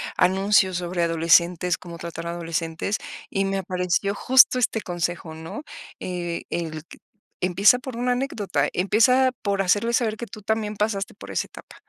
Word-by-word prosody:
anuncios 190 Hz, -1 st, +3 dB
sobre 175 Hz, 0 st, -2 dB
adolescentes, 170 Hz, +1 st, +3 dB
cómo 170 Hz, -1 st, -9 dB
tratar 170 Hz, 0 st, -6 dB
adolescentes 165 Hz, +2 st, -2 dB, 0.3 s
y 195 Hz, -1 st, 0 dB
me 195 Hz, 0 st, -1 dB
apareció 185 Hz, +1 st, -1 dB
justo 255 Hz, +3 st, +5 dB
este 225 Hz, -2 st, 0 dB
consejo, 175 Hz, -2 st, -3 dB
¿no? 160 Hz, -, -8 dB, 0.4 s
Eh, 175 Hz, -2 st, -4 dB
el 160 Hz, -2 st, -3 dB
q -, -, -15 dB, 0.5 s
empieza 195 Hz, +6 st, +5 dB
por 250 Hz, -1 st, -8 dB
una 245 Hz, +1 st, +1 dB
anécdota. 205 Hz, -, -1 dB
Empieza 250 Hz, +7 st, +3 dB
por 200 Hz, -1 st, 0 dB
hacerle 205 Hz, +5 st, +2 dB
saber 230 Hz, -2 st, +1 dB
que 235 Hz, +2 st, -7 dB
tú 215 Hz, -, -10 dB
también 215 Hz, -1 st, -2 dB
pasaste 210 Hz, -1 st, -1 dB
por -, -, -12 dB
esa -, -, -2 dB
etapa. -, -, -14 dB
190 Hz, 155 wpm, -24 LUFS, 170-215 Hz, 0.5 s, justo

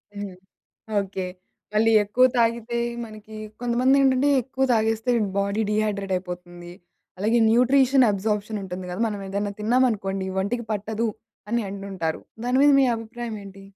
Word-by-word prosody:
హ్మ్. 200 Hz, -2 st, -6 dB, 0.7 s
ఓకే. 190 Hz, -1 st, -4 dB, 0.5 s
మళ్ళీ 225 Hz, +1 st, +4 dB
ఎక్కువ 210 Hz, +5 st, +3 dB
తాగితే 235 Hz, 0 st, +1 dB, 0.3 s
మనకి 215 Hz, 0 st, -11 dB, 0.2 s
కొంతమంది 245 Hz, +3 st, +3 dB
ఏంటంటే 270 Hz, +1 st, +3 dB
ఎక్కువ 265 Hz, +1 st, -1 dB
తాగేస్తే 225 Hz, +1 st, +1 dB, 0.3 s
బాడీ 200 Hz, +2 st, 0 dB
డీహైడ్రేట్ 205 Hz, -2 st, -1 dB
అయిపోతుంది. 175 Hz, -1 st, -8 dB, 0.5 s
అలాగే 220 Hz, +4 st, +2 dB
న్యూట్రిషన్ 260 Hz, +2 st, +5 dB
అబ్‌సార్ప్‌షన్ 210 Hz, +1 st, -1 dB
ఉంటుంది 185 Hz, -1 st, -6 dB
గదా! 180 Hz, -, -5 dB
మనం 205 Hz, -2 st, -5 dB
ఏదైనా 200 Hz, +1 st, -2 dB
తిన్నాం 245 Hz, +5 st, +3 dB
అనుకోండి 195 Hz, -2 st, -3 dB
"ఒంటికి 235 Hz, +4 st, -2 dB
పట్టదు" 215 Hz, +2 st, -2 dB, 0.4 s
అని 235 Hz, 0 st, +1 dB
అంటుంటారు 195 Hz, -5 st, -4 dB, 0.2 s
దాని 250 Hz, +1 st, +2 dB
మీద 290 Hz, -, +7 dB
మీ 270 Hz, -, +5 dB
అభిప్రాయం 230 Hz, 0 st, -6 dB
ఏంటి? 195 Hz, 0 st, -12 dB
215 Hz, 135 wpm, -24 LUFS, 195-235 Hz, 0.7 s, మీద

